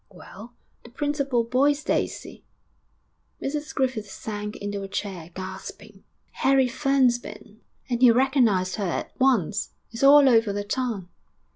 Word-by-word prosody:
'Well, 235 Hz, +3 st, -13 dB, 0.3 s
the -, -, -13 dB
principal 275 Hz, -2 st, -1 dB
boy's 280 Hz, +5 st, +1 dB
Daisy.' -, -, -3 dB, 1.0 s
Mrs 300 Hz, +2 st, -4 dB
Griffith 255 Hz, -6 st, -1 dB
sank 210 Hz, +1 st, -6 dB
into 205 Hz, 0 st, -5 dB
a 195 Hz, -, -6 dB
chair, 190 Hz, -4 st, -5 dB
gasping. 185 Hz, 0 st, -9 dB, 0.3 s
'Harry 270 Hz, -1 st, +2 dB
Ferne's 260 Hz, -1 st, +2 dB
been, 215 Hz, -2 st, -12 dB, 0.3 s
and 245 Hz, -2 st, -2 dB
he 250 Hz, -, +8 dB
recognised 230 Hz, -7 st, +2 dB
her 205 Hz, -, -2 dB
at 175 Hz, -, -3 dB
once. 255 Hz, -10 st, +1 dB, 0.2 s
It's 230 Hz, -, -7 dB
all 280 Hz, 0 st, +7 dB
over 225 Hz, -4 st, +4 dB
the 205 Hz, 0 st, -3 dB
town.' 215 Hz, -3 st, -3 dB
240 Hz, 135 wpm, -25 LUFS, 205-270 Hz, 1.0 s, he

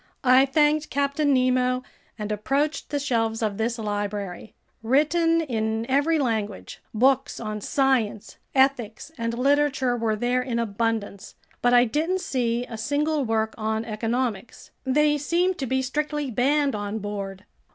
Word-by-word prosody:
I 260 Hz, +1 st, +6 dB
thanked 300 Hz, +2 st, +2 dB
Captain 280 Hz, +1 st, +1 dB
Nemo 255 Hz, -1 st, +2 dB, 0.3 s
and 210 Hz, -1 st, -4 dB
approached 275 Hz, +9 st, -1 dB
the 290 Hz, -, -1 dB
shelves 225 Hz, -5 st, -1 dB
of 210 Hz, -1 st, -2 dB
this 230 Hz, +2 st, -1 dB
library. 205 Hz, -2 st, -4 dB, 0.3 s
Written 330 Hz, +7 st, +2 dB
in 220 Hz, -5 st, -2 dB
every 290 Hz, +5 st, +2 dB
language, 220 Hz, -7 st, -3 dB
books 265 Hz, +4 st, +2 dB
on 215 Hz, -2 st, -4 dB
science, 250 Hz, -5 st, 0 dB, 0.2 s
ethics, 265 Hz, -1 st, +1 dB
and 230 Hz, -1 st, -3 dB
literature 275 Hz, -1 st, +2 dB
were 225 Hz, -2 st, 0 dB
there 245 Hz, +3 st, 0 dB
in 250 Hz, -2 st, -3 dB
abundance, 225 Hz, -2 st, -2 dB, 0.3 s
but 245 Hz, 0 st, +4 dB
I 245 Hz, 0 st, +6 dB
didn't 325 Hz, +9 st, -1 dB
see 240 Hz, -4 st, -1 dB
a 225 Hz, -3 st, -8 dB
single 290 Hz, +4 st, 0 dB
work 220 Hz, -1 st, 0 dB
on 220 Hz, +1 st, -1 dB
economics—they 245 Hz, +6 st, -1 dB
seemed 350 Hz, +5 st, 0 dB
to 265 Hz, -, -2 dB
be 265 Hz, +2 st, 0 dB
strictly 295 Hz, +1 st, -2 dB
banned 275 Hz, +4 st, +2 dB
on 205 Hz, 0 st, -3 dB
board. 200 Hz, -2 st, -6 dB
250 Hz, 140 wpm, -25 LUFS, 220-280 Hz, 0.3 s, I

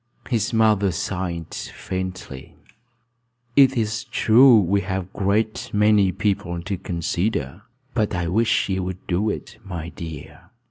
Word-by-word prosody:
His 115 Hz, -1 st, +1 dB
mother 110 Hz, -4 st, +3 dB
sighed 90 Hz, -2 st, -4 dB
faintly. 90 Hz, -8 st, -6 dB, 1.0 s
"It 135 Hz, -2 st, +6 dB
is 110 Hz, -1 st, -1 dB
true 120 Hz, +1 st, +6 dB
we 100 Hz, +1 st, +1 dB
have 95 Hz, 0 st, -2 dB
a -, -, -16 dB
great 105 Hz, +2 st, 0 dB
many 105 Hz, -2 st, +4 dB
people 95 Hz, -2 st, -1 dB
to 100 Hz, +2 st, -2 dB
consider; 85 Hz, -2 st, -2 dB, 0.3 s
but 105 Hz, -4 st, 0 dB
I 90 Hz, -1 st, -1 dB
wish 110 Hz, +6 st, +2 dB
you 95 Hz, -1 st, -1 dB
would 95 Hz, 0 st, -6 dB
do 95 Hz, +5 st, 0 dB
it, 110 Hz, +1 st, -6 dB
my 85 Hz, -5 st, -6 dB
dear." 80 Hz, -4 st, -9 dB
100 Hz, 135 wpm, -23 LUFS, 90-110 Hz, 1.0 s, It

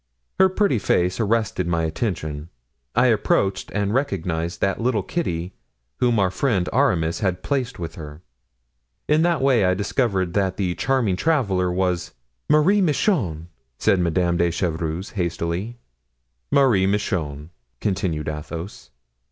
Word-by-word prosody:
Her 190 Hz, 0 st, +6 dB
pretty 190 Hz, -, +1 dB
face 90 Hz, 0 st, +1 dB
arrested 110 Hz, -4 st, 0 dB
my 85 Hz, -1 st, 0 dB
attention; 80 Hz, -3 st, -3 dB, 0.5 s
I 120 Hz, +2 st, +4 dB
approached 100 Hz, -4 st, +1 dB
and 100 Hz, 0 st, -1 dB
recognized 85 Hz, -, -1 dB
that 100 Hz, +3 st, 0 dB
little 115 Hz, -4 st, +1 dB
Kitty 90 Hz, -, -3 dB, 0.5 s
whom 120 Hz, -2 st, +2 dB
our 95 Hz, -3 st, +2 dB
friend 95 Hz, -4 st, 0 dB
Aramis 90 Hz, -, +2 dB
had 95 Hz, -4 st, -1 dB
placed 135 Hz, -3 st, -1 dB
with 85 Hz, -2 st, -5 dB
her. 75 Hz, +1 st, -10 dB, 0.8 s
In 150 Hz, +1 st, +3 dB
that 170 Hz, -4 st, +2 dB
way 130 Hz, -6 st, +4 dB
I 90 Hz, 0 st, +3 dB
discovered 95 Hz, -3 st, 0 dB
that 95 Hz, -2 st, 0 dB
the 95 Hz, -3 st, 0 dB
charming 120 Hz, -5 st, 0 dB
traveler 100 Hz, -, +1 dB
was——" 90 Hz, -1 st, -1 dB, 0.4 s
"Marie 160 Hz, +7 st, +4 dB
Michon!" 130 Hz, -, 0 dB, 0.3 s
said 100 Hz, -3 st, +2 dB
Madame 85 Hz, 0 st, +1 dB
de 85 Hz, 0 st, +2 dB
Chevreuse, 85 Hz, +1 st, -2 dB
hastily. 85 Hz, +4 st, -3 dB, 0.7 s
"Marie 115 Hz, -, +4 dB
Michon," 85 Hz, -7 st, -2 dB, 0.3 s
continued 90 Hz, -6 st, -1 dB
Athos. 80 Hz, +4 st, -6 dB
95 Hz, 130 wpm, -22 LUFS, 85-120 Hz, 0.8 s, Her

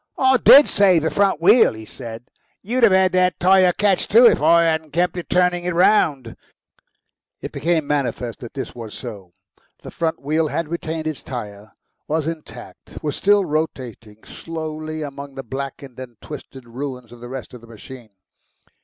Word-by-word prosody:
"I 260 Hz, 0 st, +4 dB
DID 280 Hz, +3 st, +7 dB
save 185 Hz, -5 st, +3 dB
the 160 Hz, -, 0 dB
front 200 Hz, -5 st, +1 dB
wheel," 205 Hz, -, +5 dB
he 110 Hz, 0 st, -10 dB
said; 115 Hz, -1 st, -9 dB, 0.4 s
"you'd 245 Hz, +6 st, -2 dB
have 230 Hz, -4 st, +6 dB
had 190 Hz, 0 st, +3 dB
that 185 Hz, 0 st, +1 dB
tyre 185 Hz, 0 st, +4 dB
catch, 195 Hz, +1 st, 0 dB
too, 235 Hz, +4 st, +6 dB
if 235 Hz, -, +5 dB
I 170 Hz, +2 st, +5 dB
hadn't 160 Hz, -2 st, -1 dB
kept 175 Hz, 0 st, -1 dB
turning 180 Hz, -1 st, +1 dB
it 180 Hz, -1 st, -3 dB
round." 155 Hz, -, +2 dB, 1.0 s
It -, -, -7 dB
became 165 Hz, -1 st, -1 dB
manifest 125 Hz, -5 st, -3 dB
that 120 Hz, +2 st, -10 dB
this 135 Hz, -, -6 dB
was 115 Hz, -3 st, -9 dB
so. 100 Hz, -8 st, -9 dB, 0.5 s
The -, -, -9 dB
front 165 Hz, -1 st, -2 dB
wheel 155 Hz, +3 st, -1 dB
had 165 Hz, +1 st, -3 dB
retained 160 Hz, -1 st, -4 dB
its 155 Hz, -3 st, -4 dB
tyre, 105 Hz, -4 st, -8 dB, 0.3 s
was 155 Hz, 0 st, -1 dB
intact, 165 Hz, -1 st, -9 dB
was 150 Hz, -2 st, -2 dB
still 205 Hz, -1 st, +2 dB
rotating 125 Hz, -, -5 dB
slowly 155 Hz, -1 st, -6 dB
among 140 Hz, -1 st, -9 dB
the 135 Hz, -, -7 dB
blackened 135 Hz, +1 st, -7 dB
and 120 Hz, -4 st, -10 dB
twisted 135 Hz, -4 st, -11 dB
ruins 125 Hz, -1 st, -7 dB
of 120 Hz, -, -13 dB
the 120 Hz, -, -9 dB
rest 130 Hz, -1 st, -8 dB
of 125 Hz, -, -11 dB
the 115 Hz, -, -16 dB
machine. 115 Hz, +1 st, -12 dB
155 Hz, 170 wpm, -20 LUFS, 125-175 Hz, 1.0 s, DID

